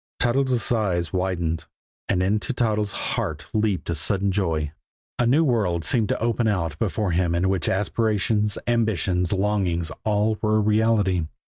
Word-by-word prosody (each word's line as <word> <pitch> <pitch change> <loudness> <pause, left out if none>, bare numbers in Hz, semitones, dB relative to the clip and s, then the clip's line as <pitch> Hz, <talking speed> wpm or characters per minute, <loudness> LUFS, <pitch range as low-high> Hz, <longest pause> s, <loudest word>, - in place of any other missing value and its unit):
Toddles' 125 -1 +1
eyes 95 -7 0
widened, 85 -3 -1 0.4
and 90 -2 +2
into 105 +6 0
Toddles' 105 -4 0 0.2
heart 80 +1 -3
leaped 105 -6 0
a 85 - 0
sudden 95 +5 0
joy. 80 -6 -1 0.5
A 120 - +3
new 145 +7 +4
world 100 - +1
seemed 110 +5 +1
to - - 0
open 115 0 0
out 85 -7 -1
before 105 -4 -1
him 85 0 +1
in 90 +2 +1
which 95 -4 0
aspirations, 105 0 0
ambitions, 95 -7 0
longings 95 -5 0
all 105 0 +1
were 110 -1 +2
a - - +4
reality. 105 -4 +2
100 Hz, 150 wpm, -24 LUFS, 90-110 Hz, 0.5 s, new